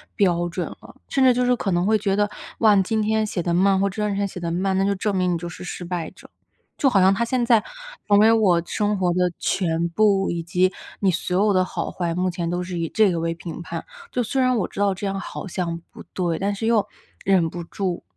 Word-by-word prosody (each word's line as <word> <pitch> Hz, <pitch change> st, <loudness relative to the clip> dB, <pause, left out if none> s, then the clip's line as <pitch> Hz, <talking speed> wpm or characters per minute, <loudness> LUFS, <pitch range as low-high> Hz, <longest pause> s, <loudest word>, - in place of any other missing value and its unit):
标 175 Hz, -4 st, +2 dB
准 175 Hz, +1 st, -3 dB
了。 -, -, -13 dB
甚 270 Hz, -, +1 dB
至 255 Hz, -1 st, +6 dB
就 250 Hz, 0 st, +1 dB
是 250 Hz, 0 st, +3 dB
可 195 Hz, -5 st, -2 dB
能 175 Hz, +1 st, +1 dB
会 215 Hz, +1 st, +3 dB
觉 200 Hz, -2 st, 0 dB
得， 205 Hz, 0 st, +1 dB, 0.3 s
哇， 215 Hz, -2 st, +6 dB
你 195 Hz, -, +5 dB
今 220 Hz, +2 st, 0 dB
天 220 Hz, +1 st, +1 dB
写 180 Hz, -5 st, -3 dB
得 175 Hz, -, 0 dB
慢 190 Hz, +2 st, +3 dB
或 200 Hz, 0 st, +2 dB
第 210 Hz, +2 st, -5 dB
2 210 Hz, -1 st, 0 dB
天 200 Hz, 0 st, 0 dB
写 180 Hz, -, -8 dB
得 170 Hz, -1 st, -3 dB
慢， 190 Hz, +2 st, 0 dB
那 195 Hz, -, +2 dB
就 200 Hz, 0 st, +1 dB
证 200 Hz, +1 st, -1 dB
明 180 Hz, -1 st, +1 dB
你 -, -, 0 dB
就 175 Hz, +1 st, -6 dB
是 175 Hz, -, -9 dB
失 180 Hz, 0 st, -6 dB
败 175 Hz, -2 st, -3 dB
者。 -, -, -17 dB, 0.5 s
就 275 Hz, -, +3 dB
好 200 Hz, -6 st, +3 dB
像 190 Hz, +1 st, +5 dB
它 235 Hz, -, 0 dB
现 240 Hz, 0 st, 0 dB
在 230 Hz, -3 st, +4 dB, 0.5 s
成 205 Hz, 0 st, +6 dB
为 220 Hz, +1 st, +6 dB
我 190 Hz, -6 st, +3 dB
生 210 Hz, +1 st, 0 dB
活 175 Hz, -2 st, +2 dB
的 180 Hz, -1 st, +1 dB
全 170 Hz, -2 st, 0 dB
部， 195 Hz, +1 st, +2 dB
以 170 Hz, -1 st, -2 dB
及 185 Hz, +2 st, +1 dB, 0.3 s
你 195 Hz, -, +2 dB
所 180 Hz, +3 st, 0 dB
有 205 Hz, -, +3 dB
的 185 Hz, 0 st, +3 dB
好 -, -, -4 dB
坏， 170 Hz, -2 st, -2 dB
目 180 Hz, +1 st, 0 dB
前 170 Hz, -1 st, -3 dB
都 175 Hz, +1 st, -1 dB
是 180 Hz, -1 st, -5 dB
以 165 Hz, -1 st, -2 dB
这 210 Hz, -5 st, +3 dB
个 165 Hz, -, -1 dB
为 165 Hz, 0 st, -1 dB
评 170 Hz, 0 st, -8 dB
判， -, -, -6 dB, 0.3 s
就 250 Hz, -, 0 dB
虽 260 Hz, +3 st, 0 dB
然 255 Hz, -1 st, +3 dB
我 200 Hz, -, 0 dB
知 200 Hz, -, -6 dB
道 200 Hz, -1 st, +3 dB
这 195 Hz, +2 st, -4 dB
样 195 Hz, 0 st, -2 dB
好 195 Hz, 0 st, -6 dB
像 170 Hz, -2 st, -3 dB
不 -, -, -11 dB
对， 175 Hz, -3 st, -1 dB
但 200 Hz, +1 st, -1 dB
是 210 Hz, +3 st, -4 dB
又 220 Hz, -3 st, +3 dB, 0.4 s
忍 185 Hz, -4 st, +3 dB
不 175 Hz, +1 st, -6 dB
住， 180 Hz, +1 st, -3 dB
190 Hz, 280 characters per minute, -23 LUFS, 175-210 Hz, 0.5 s, 至